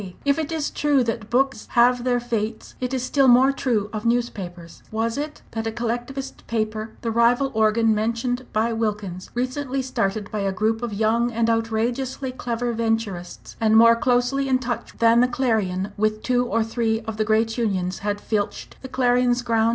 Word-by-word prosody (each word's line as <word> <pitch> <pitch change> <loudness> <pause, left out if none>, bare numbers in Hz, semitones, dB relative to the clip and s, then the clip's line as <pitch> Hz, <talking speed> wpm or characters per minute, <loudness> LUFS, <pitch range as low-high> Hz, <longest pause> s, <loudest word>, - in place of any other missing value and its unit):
If 280 +2 +2
it 315 0 -3
is 315 -2 -2
true 290 -3 +2
that 225 -2 -3
books 270 +3 +1
have 245 0 +4
their 245 -1 +2
fates, 225 -2 -3
it 250 0 -2
is 260 -2 -1
still 270 +1 +3
more 255 +2 +6
true 235 -7 0
of 215 -1 -4
newspapers. 195 -8 -3
Was 225 +1 -1
it 300 +1 -5
that 225 0 -3
a - - -1
collectivist 240 +4 -4
paper 220 -1 -2
the 230 - -2
rival 240 +4 +3
organ 220 +1 +3
mentioned 235 +3 -1
by 225 +2 +1
Wilkins 210 -5 -3
recently 260 +2 -2
started 200 -5 -2
by 215 - -2
a 195 -1 0
group 220 +4 0
of 240 -2 -3
young 225 +3 +1
and 230 0 +1
outrageously 235 +4 -1
clever 240 -1 -3
Venturists 225 -6 -3
and 220 0 +4
more 230 +1 +7
closely 250 +3 +1
in 260 - +4
touch 240 -2 -5
than 230 0 +5
the 250 - +5
Clarion 215 -7 0
with 215 +1 0
two 245 -1 +1
or 230 -1 +1
three 225 0 -1
of 220 -1 -6
the 215 - +2
great 220 +1 +1
unions, 185 -5 -1
had 205 0 -2
filched 205 -1 -3
the 260 - -8
Clarion's 245 -1 +2
ground? 230 -1 +2
230 Hz, 180 wpm, -23 LUFS, 220-250 Hz, -, more